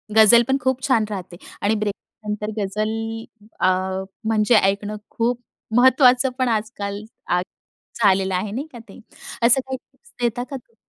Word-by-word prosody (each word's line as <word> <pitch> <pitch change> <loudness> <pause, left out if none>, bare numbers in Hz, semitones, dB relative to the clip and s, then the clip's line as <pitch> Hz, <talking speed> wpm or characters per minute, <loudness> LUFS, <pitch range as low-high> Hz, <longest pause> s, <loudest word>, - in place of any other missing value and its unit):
गझल 220 +2 +7
पण 270 +1 +2
खूप 260 0 0
छान 230 -5 +3
राहते 185 -3 -6 0.2
आणि 210 +2 +2
ब्रेकअप 210 +1 -6
नंतर 210 +1 -3
गझल 210 +2 -1 0.7
अ, - - +3 0.6
म्हणजे 220 +1 +3
ऐकणं 205 +1 +1
खूप 240 +1 -1 0.4
महत्त्वाचं, 255 0 +5
पण 255 - +2
आजकाल 210 -2 -3 0.2
आ, 180 0 +2 0.6
झालेलं 190 -2 +3
आहे 200 +3 -2
नाही 270 +8 -4
का 240 - -9
ते? - - -13 0.4
असं 245 +3 +6
काही 265 0 -5
टिप्स 470 - -27
देता 240 +1 0
का 275 +2 -8
तुम्ही 240 -3 -12
220 Hz, 155 wpm, -22 LUFS, 205-250 Hz, 0.7 s, गझल